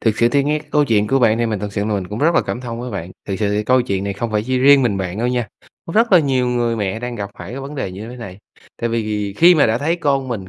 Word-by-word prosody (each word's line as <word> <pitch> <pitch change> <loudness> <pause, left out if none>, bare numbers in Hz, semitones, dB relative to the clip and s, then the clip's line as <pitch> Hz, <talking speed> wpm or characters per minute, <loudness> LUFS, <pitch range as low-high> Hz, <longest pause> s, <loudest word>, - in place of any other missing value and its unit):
thiệt 110 -2 +1
sự 120 - +3
thì 140 +2 +1
nghe 150 +1 +1
cái - - -16
câu 150 -1 +4
chuyện 105 -5 +2
của 135 - +2
bạn 115 -2 +3
thì 120 - +1
mình 110 -3 -2
thật 105 0 -5
sự 100 -1 -2
là 110 - -1
mình 95 -3 -3
cũng 105 +2 -5
rất 165 +3 +2
là - - +4
cảm 120 - -4
thông 120 -2 -6
với 125 0 -5
bạn. 95 -3 -5 0.2
Thiệt 95 - -2
sự 100 - +1
thì 105 +1 -1
câu 130 +1 +3
chuyện 100 -5 -2
này 100 - -2
không 115 +3 -4
phải 105 -1 +1
chỉ 130 -1 0
riêng 140 +1 +6
mình 110 -6 +1
bạn 95 +1 -4
đâu 120 +2 0
nha, 120 -2 -1 0.4
có 165 - -6
rất 225 +1 +2
là 180 - +8
nhiều 130 -4 +1
người 120 -1 0
mẹ 100 -1 -2
đang 125 0 -4
gặp 100 -2 -5
phải - - -8
cái 130 +3 -6
vấn 140 +2 -7
đề 130 -9 -3
như 105 +5 -8
thế 125 - -9
này, 100 -6 -9 0.4
tại 120 - -2
vì 105 -3 -2
khi 175 +2 +7
mà 155 - +4
đã 115 +2 +1
thấy 160 +5 0
con 135 -5 0
mình, 100 -6 -5
120 Hz, 340 wpm, -19 LUFS, 105-135 Hz, 0.4 s, là